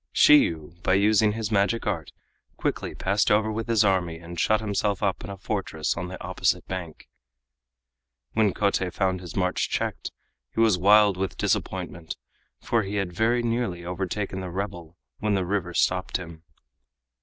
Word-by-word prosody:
Shiyu 85 Hz, -, +4 dB
by 95 Hz, -, +2 dB
using 105 Hz, +1 st, +4 dB
his 110 Hz, -1 st, -3 dB
magic 105 Hz, +3 st, +1 dB
art 95 Hz, -7 st, -2 dB, 0.5 s
quickly -, -, -2 dB
passed 100 Hz, +1 st, +1 dB
over 110 Hz, +1 st, +3 dB
with 110 Hz, +1 st, -3 dB
his 115 Hz, -3 st, +3 dB
army 90 Hz, -4 st, +1 dB
and 85 Hz, +1 st, -8 dB
shut 110 Hz, +5 st, +3 dB
himself 105 Hz, -2 st, -1 dB
up 100 Hz, -2 st, 0 dB
in 95 Hz, -, -7 dB
a 100 Hz, -, -6 dB
fortress 95 Hz, -6 st, -2 dB
on 85 Hz, +1 st, -4 dB
the 90 Hz, +1 st, -8 dB
opposite 90 Hz, 0 st, 0 dB
bank. 90 Hz, -4 st, -6 dB, 1.3 s
When 110 Hz, -3 st, +3 dB
Kotei 95 Hz, -2 st, 0 dB
found 95 Hz, -1 st, 0 dB
his 90 Hz, -, -9 dB
march 90 Hz, -1 st, 0 dB
checked -, -, -2 dB, 0.5 s
he -, -, -2 dB
was 110 Hz, -4 st, +5 dB
wild 100 Hz, +1 st, +5 dB
with 95 Hz, 0 st, -3 dB
disappointment, 85 Hz, -3 st, -2 dB, 0.4 s
for 115 Hz, -, +1 dB
he 100 Hz, 0 st, -4 dB
had 100 Hz, -3 st, -2 dB
very 115 Hz, +5 st, +1 dB
nearly 115 Hz, -7 st, -2 dB
overtaken 95 Hz, +2 st, -3 dB
the 95 Hz, -1 st, -5 dB
rebel 90 Hz, -3 st, -5 dB, 0.2 s
when 105 Hz, -1 st, +1 dB
the 95 Hz, -2 st, 0 dB
river 90 Hz, -2 st, -2 dB
stopped 90 Hz, 0 st, +1 dB
him. 85 Hz, -2 st, -10 dB
95 Hz, 165 wpm, -25 LUFS, 90-105 Hz, 1.3 s, was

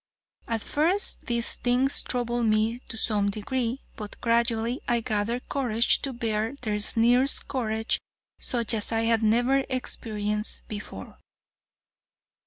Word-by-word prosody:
At 230 Hz, -2 st, -1 dB
first 345 Hz, +7 st, 0 dB
these 235 Hz, -1 st, 0 dB
things 255 Hz, +3 st, +2 dB
troubled 240 Hz, -1 st, -1 dB
me 215 Hz, +2 st, +2 dB
to 225 Hz, -, -6 dB
some 205 Hz, -2 st, +1 dB
degree, 235 Hz, +5 st, -2 dB
but 210 Hz, -1 st, -8 dB
gradually 235 Hz, +1 st, +1 dB
I 240 Hz, 0 st, +2 dB
gathered 220 Hz, +3 st, -2 dB
courage 235 Hz, -4 st, +2 dB
to 275 Hz, -, -2 dB
bear 225 Hz, 0 st, -2 dB
their 210 Hz, -3 st, -1 dB
sneers 240 Hz, +6 st, +4 dB
courage 225 Hz, -4 st, -1 dB, 0.4 s
such 235 Hz, -2 st, +1 dB
as 215 Hz, -1 st, -1 dB
I 225 Hz, 0 st, +1 dB
had 230 Hz, 0 st, +2 dB
never 240 Hz, +5 st, +3 dB
experienced 210 Hz, -4 st, -1 dB
before. 205 Hz, -, -8 dB
230 Hz, 125 wpm, -26 LUFS, 215-245 Hz, 0.4 s, sneers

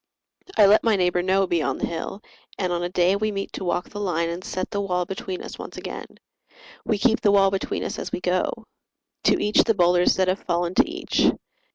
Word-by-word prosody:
I 210 Hz, -, +7 dB
let 205 Hz, +2 st, +5 dB
my 225 Hz, -2 st, +3 dB
neighbour 180 Hz, -2 st, +1 dB
know 190 Hz, +2 st, +2 dB
beyond 160 Hz, -7 st, -1 dB
the -, -, 0 dB
hill; 180 Hz, +5 st, -5 dB, 0.3 s
And 180 Hz, -2 st, -1 dB
on 175 Hz, -, -1 dB
a 175 Hz, -, -2 dB
day 180 Hz, +1 st, +2 dB
we 215 Hz, +1 st, -1 dB
meet 195 Hz, -1 st, -5 dB
to -, -, -5 dB
walk 175 Hz, 0 st, -1 dB
the 205 Hz, -, -7 dB
line 170 Hz, -4 st, -1 dB
And 170 Hz, +2 st, -5 dB
set 185 Hz, 0 st, -4 dB
the 200 Hz, -, -1 dB
wall 180 Hz, -2 st, -1 dB
between 190 Hz, 0 st, -5 dB
us -, -, -9 dB
once -, -, -8 dB
again. -, -, -6 dB, 0.8 s
We 215 Hz, -, 0 dB
keep 225 Hz, +2 st, +2 dB
the 205 Hz, -, +3 dB
wall 195 Hz, -1 st, +4 dB
between 195 Hz, -, -2 dB
us -, -, -4 dB
as -, -, -5 dB
we -, -, -2 dB
go. 180 Hz, 0 st, 0 dB, 0.7 s
To -, -, +4 dB
each 210 Hz, 0 st, +3 dB
the 225 Hz, -, +1 dB
boulders 175 Hz, -1 st, +4 dB
that 185 Hz, -1 st, +1 dB
have 185 Hz, +2 st, +1 dB
fallen 170 Hz, +1 st, -1 dB
to 185 Hz, -, +3 dB
each. 355 Hz, +1 st, +1 dB
185 Hz, 225 wpm, -24 LUFS, 175-200 Hz, 0.8 s, I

